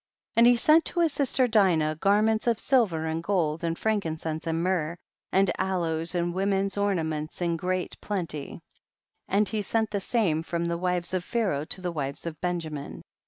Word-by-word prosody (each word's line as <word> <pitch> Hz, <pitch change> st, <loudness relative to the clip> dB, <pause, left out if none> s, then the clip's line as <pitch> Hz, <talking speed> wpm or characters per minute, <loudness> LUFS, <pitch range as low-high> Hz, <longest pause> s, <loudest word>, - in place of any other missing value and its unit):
84. -, -, +3 dB
And 235 Hz, -, +8 dB
he 245 Hz, -, +6 dB
sent 310 Hz, +7 st, +4 dB
to 350 Hz, -, -2 dB
his 325 Hz, -4 st, +2 dB
sister 260 Hz, -2 st, +1 dB
Dinah 175 Hz, -9 st, +3 dB
garments 215 Hz, +4 st, +2 dB
of 230 Hz, -2 st, +2 dB
silver 205 Hz, -12 st, +2 dB
and 160 Hz, +1 st, -2 dB
gold, 165 Hz, -4 st, 0 dB
and 165 Hz, 0 st, -1 dB
frankincense 160 Hz, -7 st, -2 dB
and 165 Hz, +1 st, 0 dB
myrrh, 175 Hz, -3 st, 0 dB, 0.3 s
and 195 Hz, -1 st, +3 dB
aloes 170 Hz, -2 st, -1 dB
and 175 Hz, 0 st, 0 dB
women's 195 Hz, +1 st, 0 dB
ornaments 160 Hz, -7 st, -1 dB
in 170 Hz, -1 st, 0 dB
great 180 Hz, +2 st, -2 dB
plenty, 165 Hz, -8 st, -4 dB, 0.7 s
and 205 Hz, +2 st, +2 dB
he 215 Hz, -2 st, -1 dB
sent 220 Hz, +2 st, 0 dB
the 205 Hz, -, 0 dB
same 185 Hz, -9 st, +1 dB
from 170 Hz, +1 st, -2 dB
the 170 Hz, 0 st, -1 dB
wives 180 Hz, -1 st, -1 dB
of 185 Hz, -2 st, 0 dB
Pharaoh 190 Hz, -10 st, -1 dB
to 185 Hz, -, -3 dB
the 180 Hz, -1 st, -2 dB
wives 140 Hz, -3 st, -4 dB
of 160 Hz, -2 st, -6 dB
Benjamin. 165 Hz, -5 st, -4 dB
180 Hz, 180 wpm, -27 LUFS, 160-205 Hz, 0.7 s, And